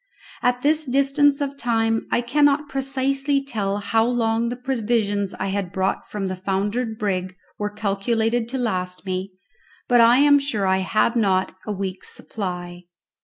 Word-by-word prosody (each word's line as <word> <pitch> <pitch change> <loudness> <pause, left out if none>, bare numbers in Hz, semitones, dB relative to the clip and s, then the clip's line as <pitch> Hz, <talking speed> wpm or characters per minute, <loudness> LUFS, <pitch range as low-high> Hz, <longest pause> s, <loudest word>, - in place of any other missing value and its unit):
At 245 0 +1
this 305 +1 +2
distance 275 +2 +3
of 280 0 -3
time 225 -1 0
I - - +2
cannot 290 +3 +2
precisely 270 +1 0
tell 205 -7 -2
how 225 +2 +1
long 230 -1 +1
the 245 - -3
provisions 225 -6 -1
I 195 - -3
had 195 -2 -2
brought 190 +1 -1
from 205 -2 -3
the 185 0 -2
foundered 205 +5 -2
brig 185 -3 -2 0.2
were 210 0 -1
calculated 225 +3 -1
to 265 - -3
last 185 -6 -2
me, 185 0 -3 0.5
but 245 -1 +5
I 235 +2 +6
am 285 +1 +6
sure 245 -8 -1
I 190 0 +2
had 215 +5 +1
not 190 -5 +1
a - - -1
week's 190 -2 -4
supply. 180 -3 -6
225 Hz, 160 wpm, -22 LUFS, 195-255 Hz, 0.5 s, I